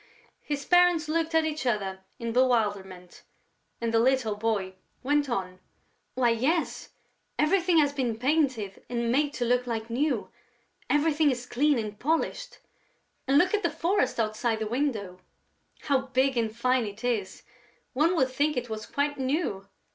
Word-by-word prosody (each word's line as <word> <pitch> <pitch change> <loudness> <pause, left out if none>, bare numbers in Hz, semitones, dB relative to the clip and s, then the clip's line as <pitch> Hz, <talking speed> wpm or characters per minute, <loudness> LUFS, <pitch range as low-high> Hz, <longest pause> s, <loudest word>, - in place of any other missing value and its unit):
His 285 -1 -4
parents 355 -3 +4
looked 325 +1 -1
at 320 -1 +4
each 310 -1 -3
other 195 -5 -1 0.2
in 230 -1 -4
bewilderment; 205 -8 0 0.6
and 230 -1 -2
the 225 - +4
little 240 -3 +2
boy 205 -3 -1 0.3
went 290 +1 +1
on: 185 -5 -3 0.6
"Why, 250 -2 +3
yes, 280 +9 -1 0.5
everything 355 +2 +3
has 290 -2 +3
been 250 -5 -1
painted 255 -7 0
and 235 -1 -1
made 290 +3 +2
to 245 - -1
look 250 +1 +1
like 230 -1 -4
new; 255 -2 -1 0.6
everything 295 0 +3
is 250 -2 -2
clean 285 +3 +2
and 215 -2 -5
polished.... 330 - -1 0.7
And 270 +2 +4
look 365 +6 +3
at 420 - +2
the 340 - +1
forest 335 0 0
outside 220 +1 0
the 220 - -3
window!... 215 -7 -2 0.6
How 270 -3 0
big 265 +1 +1
and 225 -2 0
fine 245 +1 +1
it 205 +2 -9
is!... 220 -6 -2 0.5
One 315 +7 +2
would 260 -5 +1
think 290 +2 0
it 245 -2 -3
was 215 0 -5
quite 285 0 -1
new!... 260 - -2
255 Hz, 155 wpm, -27 LUFS, 225-295 Hz, 0.7 s, parents